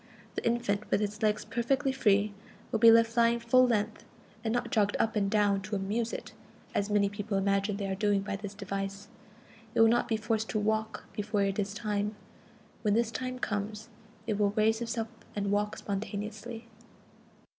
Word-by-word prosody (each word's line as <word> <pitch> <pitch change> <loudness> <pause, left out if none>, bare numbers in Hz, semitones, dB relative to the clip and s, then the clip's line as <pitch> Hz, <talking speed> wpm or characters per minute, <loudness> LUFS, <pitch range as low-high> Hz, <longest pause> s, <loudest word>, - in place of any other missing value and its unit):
The - - -4
infant, 230 -3 0
with - - +3
its 210 0 -3
legs 215 -1 +1
perfectly 250 +5 0
free, 210 -5 +2 0.4
will 225 - +1
be 230 +1 +9
left 230 0 +5
lying 235 0 +4
full 255 +2 +5
length, 220 -2 0 0.4
and 220 - 0
not 240 0 -1
jogged 205 -2 +2
up 225 0 +1
and 200 -2 +1
down 205 -2 +2
to 210 +2 -4
"amuse" 215 +4 -1
it, - - -6 0.4
as 200 +1 0
many 205 -1 +3
persons 205 +1 -5
imagine 200 +1 +1
they 200 - -3
are 195 - -1
doing 205 0 +1
by 200 0 -3
this 200 0 -7
device. 195 0 -4 0.7
It - - +2
will 225 - +8
not 235 +2 +3
be 225 - +1
forced 220 0 -1
to 215 - 0
walk 220 +1 -1
before 210 -1 0
it 195 +1 0
is 200 0 -2
time. 210 -1 -1 0.7
When 210 -2 +2
this 230 0 +2
time 255 +1 -4
comes, 210 -1 -3 0.4
it 215 -2 -1
will 205 -1 +2
raise 220 +1 +3
itself 230 -1 -2 0.3
and 200 -1 -1
walk 205 +1 0
spontaneously. 215 +3 -5
210 Hz, 185 wpm, -30 LUFS, 200-230 Hz, 0.7 s, be